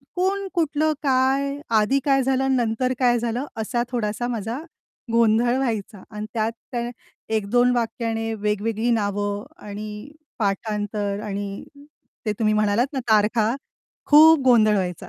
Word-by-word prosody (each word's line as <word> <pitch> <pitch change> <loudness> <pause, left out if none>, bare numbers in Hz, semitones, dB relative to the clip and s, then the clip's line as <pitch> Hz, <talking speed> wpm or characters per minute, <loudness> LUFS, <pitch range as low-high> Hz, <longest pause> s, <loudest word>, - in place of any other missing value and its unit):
कोण, 390 +2 0
कुठलं, 310 -2 +1
काय, 275 +1 +1 0.2
आधी 265 +6 +2
काय 270 -1 +3
झालं 265 0 +1
नंतर 245 +2 0
काय 240 -2 +3
झालं? 240 +4 -2
असा 235 +2 -1
थोडासा 235 0 -2
माझा 230 +2 -3 0.5
गोंधळ 230 +2 +3
व्हायचा 220 -6 -3
आणि 210 0 -5
त्यात 220 0 0 0.2
त्याने 240 -1 -2 0.5
1-2 245 +4 +2
वाक्याने 225 -1 -2
वेगवेगळी 215 +2 -1
नावं 205 -2 -1 0.2
आणि 210 +5 -7 0.3
पाठांतर 205 0 -2
आणि 200 -1 -5 0.6
ते 215 - 0
तुम्ही 215 -1 +2
म्हणालात 215 +4 +2
ना, 265 - -1
तारखा 215 +2 +3 0.5
खूप 310 +1 +8
गोंधळ 220 -4 +5
व्हायचा. 180 -3 -3
230 Hz, 125 wpm, -23 LUFS, 210-255 Hz, 0.6 s, खूप